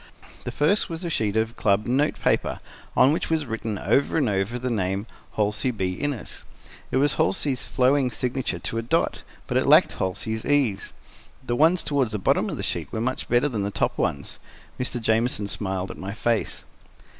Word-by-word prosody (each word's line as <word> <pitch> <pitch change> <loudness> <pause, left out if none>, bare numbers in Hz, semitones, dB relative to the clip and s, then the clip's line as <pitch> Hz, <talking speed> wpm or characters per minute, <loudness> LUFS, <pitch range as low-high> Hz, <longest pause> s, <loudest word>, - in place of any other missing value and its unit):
The - - -3
first 155 +8 +2
was 165 +1 -5
a 170 - -2
sheet 110 -6 0
of 110 +1 0
club 100 0 +2
note 135 +5 +1
paper, - - +1 0.4
on 135 +3 +6
which 165 - -2
was 160 -2 +1
written, 110 -3 -3
over 140 +10 +1
and 145 -5 +2
over, 100 +3 0
the 125 0 -2
name 95 -1 -1 0.3
"Halsey 105 +4 +1
B. 95 -6 -1
Innes." 140 +4 -4 0.5
It - - 0
was 145 +1 +3
Halsey's 125 +8 +1
flowing 130 +1 +2
signature 125 -5 -2
to 115 +6 -3
a - - -1
dot, 115 - 0 0.2
but - - 0
it - - +1
lacked - - +6
Halsey's 110 +4 -3
ease. 135 -9 +1 0.5
The 120 - 0
ones 165 +6 +4
toward 140 -6 +1
the 105 - -3
bottom 95 - +1
of - - -4
the - - -4
sheet - - -3
were - - -3
much 130 +3 -2
better 120 +4 +3
than 115 -7 -2
the 100 - -1
top - - 0
ones. 70 -1 -2 0.4
Mr. 125 -1 -2
Jamieson 110 -2 +1
smiled 95 -2 -2
at - - -10
my 95 +1 -5
face. 115 0 -1
115 Hz, 190 wpm, -25 LUFS, 105-135 Hz, 0.5 s, on